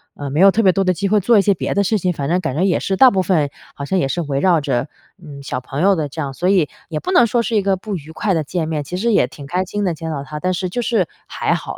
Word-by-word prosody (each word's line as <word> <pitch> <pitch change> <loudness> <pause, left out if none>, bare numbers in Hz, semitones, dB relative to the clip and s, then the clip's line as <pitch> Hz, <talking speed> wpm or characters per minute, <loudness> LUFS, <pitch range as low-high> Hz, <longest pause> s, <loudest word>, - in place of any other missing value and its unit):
呃， 145 -1 -6
没 150 - -1
有 195 +2 +8
特 225 +3 +1
别 190 - +6
多 195 +2 0
的 185 -1 +2
机 195 +4 -1
会 210 +1 +3
做 220 +3 +3
一 - - +5
些 200 - +3
别 - - -3
的 200 - +3
事 215 +2 +1
情， 180 0 0
反 140 -3 -4
正 175 +2 +2
感 155 -7 -3
觉 170 - +1
也 190 -2 +2
是 190 -1 -2
大 260 -1 +7
部 190 -1 +1
分 160 -6 +1 0.3
好 140 - -6
像 190 +5 0
也 135 - +1
是 155 +6 -3
围 140 -3 -2
绕 175 0 +3
着， 125 -1 -1 0.4
嗯， 140 -3 -10
小 125 -2 -3
朋 135 +4 -5
友 195 0 +5
的 150 -3 -2
这 160 - -9
样， 135 -1 -4
所 180 +7 -1
以 180 -7 +3 0.2
也 155 -2 -3
不 370 - -4
能 245 - +6
说 235 +2 +1
是 230 - -2
一 210 - +3
个 195 -1 +1
不 200 +1 -5
愉 155 -1 -8
快 195 +3 -1
的 160 - 0
见 160 +2 -3
面， 155 -2 -2
其 180 +5 -5
实 230 +3 +1
也 125 - +3
挺 140 +2 -11
开 180 +6 -1
心 205 +2 -4
的 180 - 0
见 160 0 -6
到 140 -2 -4
她， 150 +2 -7
但 185 +3 -1
是 185 0 -3
就 245 +7 -2
是 220 -8 +1 0.2
还 - - -1
好， - - -5
180 Hz, 355 characters per minute, -19 LUFS, 150-195 Hz, 0.4 s, 有